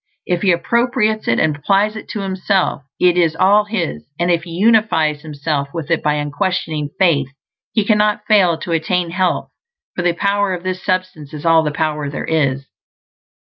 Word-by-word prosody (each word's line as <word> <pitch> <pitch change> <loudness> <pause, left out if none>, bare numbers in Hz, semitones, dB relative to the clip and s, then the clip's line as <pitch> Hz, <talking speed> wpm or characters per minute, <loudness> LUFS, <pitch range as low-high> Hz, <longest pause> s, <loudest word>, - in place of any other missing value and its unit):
If 175 -1 -1
he 195 - +3
appropriates 220 +4 0
it 120 - +2
and 155 -2 +1
applies 200 +8 +1
it 220 - -9
to 210 - -4
himself 190 -3 0 0.2
it 180 -1 +3
is 165 -2 +2
all 200 +4 +4
his; 180 - -3
and 175 +1 +1
if 170 0 0
he - - -10
unifies 170 -6 +2
himself 145 -2 -3
with 165 -1 -5
it 165 - +2
by 150 0 +1
unquestioning 150 +1 -2
faith, 160 -8 +3 0.5
he 215 -3 +1
cannot 210 0 +2
fail 185 -6 +4
to 170 - -6
attain 165 +1 0
health, 185 0 -1 0.4
for - - -2
the 175 -1 +1
power 200 +1 0
of 175 - -9
this 185 0 -4
Substance 185 -6 -3
is 150 - -8
all 165 -1 +5
the 155 - -1
power 150 -1 -2
there 140 - -5
is. 140 -4 0
175 Hz, 180 wpm, -18 LUFS, 155-200 Hz, 0.5 s, all